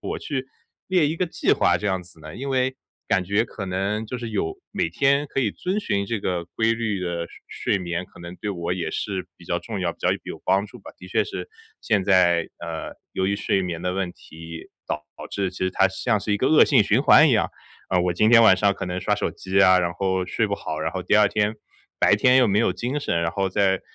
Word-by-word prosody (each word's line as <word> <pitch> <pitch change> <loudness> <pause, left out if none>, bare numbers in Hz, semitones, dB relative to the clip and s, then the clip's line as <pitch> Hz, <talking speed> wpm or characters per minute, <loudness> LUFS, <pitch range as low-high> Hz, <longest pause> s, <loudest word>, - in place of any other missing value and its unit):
我 - - -4
去 135 -3 -4 0.4
列 180 -5 +3
一 155 - -2
个 185 - 0
计 165 - +1
划 - - +3
这 105 - -4
样 95 -2 0
子 85 -2 -17
呢？ 75 +1 -10
因 135 +3 -5
为 130 0 0 0.3
感 95 -3 +2
觉 100 +4 +1
可 100 -4 -7
能 100 +4 -1
就 125 +2 -5
是 115 -1 -5
有 80 -6 -2 0.2
每 - - 0
天 140 - +2
可 - - -4
以 115 -5 +1
遵 185 +3 -2
循 100 - -1
这 115 -1 -2
个 90 -3 -2
规 110 +6 0
律 110 -4 -2
的 85 -2 -2
睡 - - -5
睡 - - +2
眠， 85 0 -3
可 - - -19
能 85 +1 -8
对 105 - -4
我 85 -2 -3
也 85 -3 -3
是 95 0 -3
比 - - -16
较 - - -1
重 - - -5
要， - - -1
比 - - -26
较 - - +1 0.2
有 - - -7
帮 100 +2 +2
助 115 - -13
吧。 - - -11
的 90 - -11
确 90 - +1
是 - - -6 0.3
现 105 -3 +1
在， 90 -4 +3
呃， - - -6 0.2
由 95 - -1
于 100 +1 0
睡 95 -2 0
眠 85 -2 -4
的 90 - -1
问 95 -2 -2
题 80 +1 -11 0.2
导 75 - -2 0.3
致 100 -2 -1
其 90 - -10
实 95 0 0
它 95 - +3
像 105 +3 0
是 105 +1 -2
一 - - +2
个 130 - +1
恶 155 - +7
性 - - +4
循 - - +2
环 - - +7
一 - - +3
样。 - - +2 0.4
呃， 90 - +3
我 90 0 +1
今 110 +5 +3
天 115 0 +7
晚 95 -4 +7
上 100 +1 +3
可 - - -5
能 90 +1 -3
刷 105 - +1
手 105 - -2
机 95 +1 -1
啊， 95 -1 +6
然 85 -1 0
后 95 0 -1
睡 110 +4 0
不 100 - 0
好， 80 0 -5
然 80 - -1
后 95 - -4
第 - - +2
2 105 0 +6
天 105 0 0 0.5
白 100 - +5
天 125 +4 +4
又 125 -4 +4
没 100 +1 +2
有 115 - +2
精 130 +5 -3
神， 85 -11 -1
然 85 - 0
后 95 0 -1
再 95 0 +1
95 Hz, 275 characters per minute, -23 LUFS, 90-110 Hz, 0.5 s, 恶